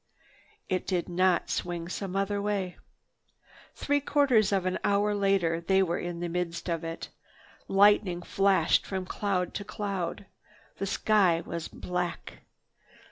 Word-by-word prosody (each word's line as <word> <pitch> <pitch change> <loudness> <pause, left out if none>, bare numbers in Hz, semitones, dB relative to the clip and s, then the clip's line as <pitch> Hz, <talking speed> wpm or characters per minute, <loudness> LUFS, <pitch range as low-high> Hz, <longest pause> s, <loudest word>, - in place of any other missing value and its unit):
It 185 - -2
did 180 -3 0
not 185 +1 +1
swing 175 -1 -3
some 190 +1 -5
other 200 +1 0
way. 200 -3 -2 1.0
Three 285 0 +1
quarters 265 -8 +3
of 195 -2 +1
an 185 - -1
hour 205 +1 +2
later 195 -5 +1
they 190 +3 +3
were 170 -2 -1
in 175 -1 -5
the 175 - -1
midst 170 0 -3
of 165 -1 -2
it. 165 0 -6 0.6
Lightning 195 -3 +4
flashed 195 +1 +3
from 190 -1 -4
cloud 185 -2 -1
to 205 - -4
cloud. 200 -3 -4 0.5
The 195 - -3
sky 190 -5 +2
was 170 -1 -4
black. 180 -1 -4
185 Hz, 135 wpm, -28 LUFS, 175-200 Hz, 1.0 s, Lightning